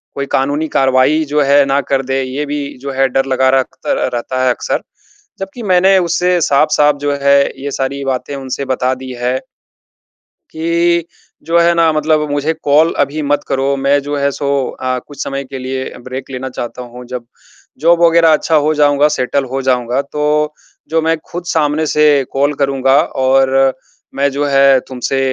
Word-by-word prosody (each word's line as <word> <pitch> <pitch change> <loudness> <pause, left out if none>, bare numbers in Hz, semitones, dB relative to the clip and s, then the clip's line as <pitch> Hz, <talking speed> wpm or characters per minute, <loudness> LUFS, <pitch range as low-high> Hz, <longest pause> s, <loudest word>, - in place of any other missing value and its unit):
कोई 140 - -2
कानूनी 145 +4 0
कार्यवाही 135 +4 +2
जो 150 +1 0
है, 140 0 +4
ना 135 +1 +1
कर 135 0 -1
दें। 135 +1 -1
ये 130 +3 -4
भी 145 -1 -5
जो 140 +2 -6
है, 135 0 +1
डर 135 +1 0
लगा 130 0 +2
रखतर 130 - -3
अ, - - 0
रहता 130 +2 -2
है - - +3
अक्सर, - - -3 0.6
जबकि 195 +5 -7
मैंने 190 0 +4
उससे 180 0 +1
साफ-साफ 150 0 +3
जो 145 0 0
है, 140 0 +5 0.2
ये 140 - -3
सारी 140 +1 -3
बातें 135 +2 -3
उनसे 135 0 -5
बता 130 0 0
दी 130 0 -9
हैं 125 +1 0 1.1
कि, 170 +1 0 0.4
"जो 165 +1 +1
है 170 0 +4
ना, 165 -1 +3
मतलब 155 0 +1
मुझे 145 +2 0
कॉल 155 +3 +3
अभी 150 +3 -5
मत 145 - +1
करो, 135 +1 0
मैं 140 +1 +2
जो 145 +1 -4
है, 140 0 +1
सो 140 +1 -3 0.3
अ, 130 0 -1
कुछ 145 - -6
समय 135 0 -4
के 135 0 -8
लिए 130 +1 -4 0.2
ब्रेक 130 +2 -6
लेना 130 0 -5
चाहता 120 +1 -5
हूँ। 125 0 -10
जब 125 -1 -6 0.5
जॉब 170 +3 +3
वग़ैरह 165 -1 +5
अच्छा 160 +1 +1
हो 155 - +2
जाऊँगा, 145 0 +3
सेटल 140 -1 -1
हो 135 +1 -2
जाऊँगा, 125 0 0
तो 150 +1 -1 0.4
जो 165 0 +1
मैं 165 +1 +1
खुद 175 0 -6
सामने 155 -2 0
से 150 0 +2 0.3
कॉल 140 +2 +1
करूँगा 135 -1 +2 0.3
और 135 0 +3 0.4
मैं 140 +1 +1
जो 145 +2 -1
है, 135 -1 +4
तुमसे 130 +1 -2
140 Hz, 180 wpm, -15 LUFS, 130-150 Hz, 1.1 s, है